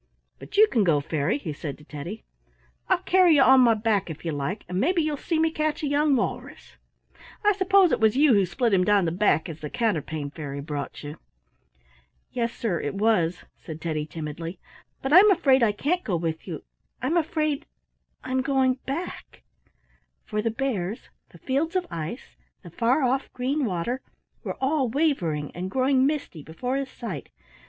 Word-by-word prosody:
But 405 - -9
you 430 - +9
can 230 - +2
go, 165 -6 +3
Fairy," 150 - -1
he 170 - -5
said 145 -1 -6
to 150 - -17
Teddy. 155 +9 -7 0.7
"I'll 375 -1 +2
carry 365 -4 +5
you 275 - +6
on 260 0 +7
my 235 -2 +5
back 210 -4 0
if 160 +1 -8
you 165 - -1
like, 145 +7 -3
and 180 +1 -2
maybe 335 - +2
you'll 305 -1 -1
see 325 +3 -2
me 320 0 +2
catch 310 -1 -2
a - - +1
young 290 0 +3
walrus. 250 +4 -4 0.7
I 415 - +6
suppose 380 -2 +4
it - - +1
was 220 +2 +3
you 290 -2 +5
who 200 -3 +3
split 225 +5 0
him 185 -1 +4
down 205 -1 +3
the 165 - 0
back, 185 -1 +2
as 160 -2 -8
the 150 - -6
Counterpane 155 -9 -2
Fairy 140 -2 -6
brought 145 -1 -5
you." 150 +2 -8 1.1
"Yes, 235 -2 -1
sir, 205 -9 -2
it 145 - -3
was," 190 -5 +1
said 160 -2 -8
Teddy, 155 -2 -3
timidly; 165 +3 -6 0.5
"but 270 +2 0
I'm 390 +5 +9
afraid 280 -9 +4
I 225 -3 +4
can't 320 - -1
go 190 - -1
with 165 -1 -3
you; - - -6 0.4
I'm 265 +7 -1
afraid 310 -3 0 0.6
I'm 260 0 0
going 265 -1 +1
back," 310 +7 -6 0.8
—for 210 -1 -2
the 230 - 0
bears, 220 -5 -3 0.2
the - - -16
fields 290 +6 -1
of 365 -1 +1
ice, 170 - -6 0.3
the 175 - -11
far 245 - +1
off 260 +2 0
green 265 +3 -1
water, 215 +6 -2 0.4
were - - -4
all 270 -1 +1
wavering 205 - 0
and 180 +2 -4
growing 260 +3 +3
misty 285 - -3
before 245 - -4
his 275 -1 -2
sight. 200 - -7
230 Hz, 185 wpm, -25 LUFS, 170-280 Hz, 1.1 s, you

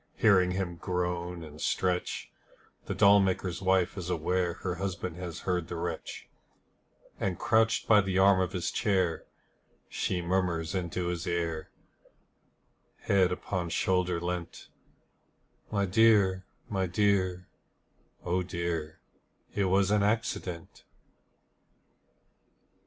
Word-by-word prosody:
Hearing 95 -4 +4
him 90 -2 -3
groan 90 -1 -3
and 75 -1 -11
stretch 90 -1 -1 0.6
The - - -2
doll 100 +1 +6
maker's 95 -2 -1
wife 95 -2 +2
is 90 -1 -5
aware 90 +1 0
Her 90 -1 -4
husband 90 -2 -4
has 90 -2 -6
heard 90 -3 -1
the 85 - -5
wretch, 85 - -5 0.9
And 95 -3 -1
crouched 110 0 +2
by 105 -2 +6
the 95 -1 -1
arm 95 0 +5
of 95 -1 -1
his 90 -3 -2
chair, 95 -5 0 0.6
She 90 - -2
murmurs 85 -2 -1
into 90 -1 -2
his 85 -1 -4
ear, 85 -2 -2 1.3
Head 95 -2 +3
upon 90 -1 -3
shoulder 90 0 +1
leant: 85 -1 -5 1.0
'My 100 -2 +1
dear, 95 -2 +4 0.2
my 95 -2 -1
dear, 95 -1 +1 0.8
oh 90 +1 +1
dear, 85 -3 -4 0.5
It 100 - +1
was 95 +1 +2
an 105 -1 +3
accident.' 100 -5 -2
90 Hz, 115 wpm, -29 LUFS, 85-95 Hz, 1.3 s, doll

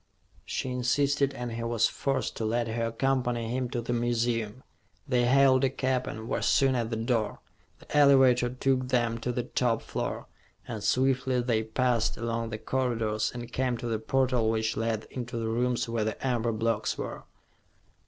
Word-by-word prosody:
She 130 - -3
insisted 140 +3 +1
and 120 -2 -4
he 115 +1 -4
was 115 -1 +2
forced 135 -1 -2
to - - -3
let 115 +2 0
her 115 +1 -1
accompany 120 -1 0
him 125 0 -1
to 120 - -2
the 120 +1 -2
museum. 120 -1 -1 0.4
They 125 -3 +2
hailed 130 +1 +5
a 135 - +4
cab 130 -1 -1
and 110 +1 -6
were - - -1
soon 135 -1 +3
at 120 -3 -1
the 115 - -2
door. 115 -2 -1 0.4
The - - -9
elevator 135 -4 +5
took 130 0 0
them 120 -3 +1
to 125 - -2
the 125 0 -2
top 115 -2 0
floor, - - -4 0.4
and 110 -3 -5
swiftly 130 0 +2
they 120 -3 +1
passed 115 +1 0
along 115 0 -2
the 110 - -4
corridors 115 -3 -1
and 120 0 -8
came 125 -2 0
to 120 - -7
the 115 -2 -1
portal 125 -1 +1
which 110 0 0
led 115 -1 -1
into 120 -2 -5
the 115 -1 -2
rooms 120 +2 0
where 115 -1 -1
the 110 +4 -4
amber 120 -2 +1
blocks 110 0 -1
were. - - -6
120 Hz, 180 wpm, -28 LUFS, 115-130 Hz, 0.4 s, hailed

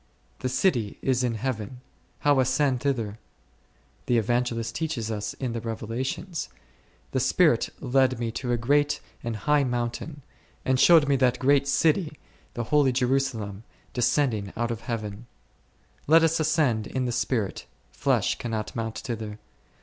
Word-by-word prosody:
The 130 - -2
city 125 - +1
is 130 -1 +1
in 120 -2 0
Heaven; 115 0 -4 0.4
how 145 -2 +4
ascend 130 0 +2
thither? 115 -6 -2 0.9
The 120 - +3
Evangelist 115 0 0
teaches 140 -9 -2
us 105 -1 -3
in 125 -3 -3
the 115 - -3
Revelations, 120 - -4 0.6
The - - 0
Spirit - - +3
led 130 -1 +2
me 115 -1 -2
to 125 +2 -3
a 120 - +2
great 145 +5 +2 0.2
and 115 -1 -3
high 145 +7 +2
mountain, 125 +4 -3 0.4
and 130 -1 +2
shewed 165 -2 +7
me 140 -1 +3
that 125 -1 +2
great 140 +1 +3
city, 155 +3 +2 0.4
the 120 - -2
holy 145 +2 +3
Jerusalem, 125 -5 -1 0.3
descending 125 -5 +1
out 120 0 0
of 115 -1 -4
Heaven. 115 -2 -5 0.8
Let 160 +2 +6
us 165 0 +2
ascend 145 -8 +1
in 130 -1 -2
the 120 - -1
spirit, 115 -4 -1 0.2
flesh - - +1
cannot 110 -3 -4
mount 115 -1 -3
thither. 110 -5 -5
125 Hz, 145 wpm, -26 LUFS, 115-140 Hz, 0.9 s, shewed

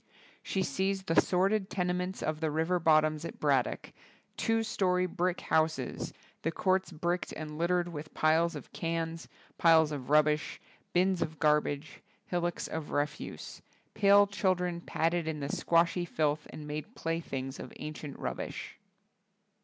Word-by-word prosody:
She 190 - -1
sees 190 +5 -1
the 165 -3 +4
sordid 195 +2 +1
tenements 180 0 -1
of 155 0 -1
the 160 - +1
river 160 +4 +1
bottoms 155 -1 +3
at - - -7
Braddock, - - +1 0.4
''two 225 -1 +1
story 185 -4 +1
brick 180 0 -1
houses... 160 -5 0 0.3
the 165 - 0
courts 190 +2 +1
bricked 175 +2 -2
and 155 0 -6
littered 175 +1 +2
with 155 -2 -8
piles 160 +2 +3
of 145 - -9
cans, 165 0 -3 0.3
piles 160 -2 +6
of 140 -3 -5
rubbish, 150 0 +3 0.3
bins 185 0 +2
of 155 0 -2
garbage, 150 -1 +1 0.2
hillocks 175 -1 -2
of 160 -2 -5
refuse.. 145 +1 -3 0.3
.pale 200 0 +6
chil 200 -2 +1
dren 175 -1 -3
paddled 165 0 0
in 155 -1 -2
the 140 -1 -3
squashy 170 +1 +2
filth 150 -2 0
and 150 - -8
made 150 +9 -6
playthings 140 -5 -3
of - - -7
ancient 150 -2 -7
rubbish." - - -5
165 Hz, 145 wpm, -31 LUFS, 155-180 Hz, 0.4 s, piles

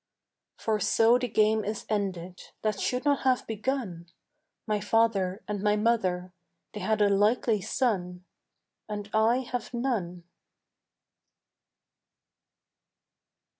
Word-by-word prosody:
For 220 -1 -1
so 225 +5 +4
the 250 - -1
game 215 0 +2
is 210 +1 -4
ended 185 -4 -3 0.2
That 215 -2 0
should 250 +6 -1
not 285 -1 +3
have 255 -1 +1
begun. 215 -6 -3 0.6
My 215 -2 0
father 205 -2 +1
and 205 -2 -3
my 210 0 +3
mother 185 -5 0 0.4
They 210 - -5
had 210 +2 +1
a - - +5
likely 210 +2 +2
son, 180 -7 -1 0.6
And 205 -1 -5
I 225 +4 +3
have 245 -1 -5
none. 200 -9 -2
215 Hz, 110 wpm, -28 LUFS, 195-230 Hz, 0.6 s, a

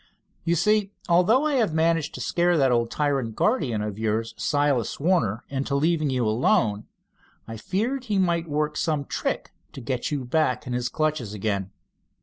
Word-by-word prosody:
You 170 - +1
see, 210 +2 +2
although 185 - +4
I 305 - +1
have 215 -10 +1
managed 165 -1 +1
to - - -6
scare 175 0 +2
that 135 -3 +3
old 120 -1 +1
tyrant 135 -7 -1
guardian 130 - +1
of 105 -1 -5
yours, 110 +1 -1
Silas 145 -5 0
Warner, 140 - +1
into 140 +1 -2
leaving 155 +1 +1
you 125 -3 0
alone, 110 -1 +1 0.6
I 115 - -6
feared 225 - -2
he 210 -4 0
might 170 -3 +1
work 150 +1 -1
some 150 -4 0
trick - - -3 0.2
to - - -8
get 125 +2 -3
you 145 -4 -3
back 125 -2 0
in 125 - -4
his 120 0 -1
clutches 150 -9 -1
again." 100 -2 -2
145 Hz, 170 wpm, -25 LUFS, 120-170 Hz, 0.6 s, although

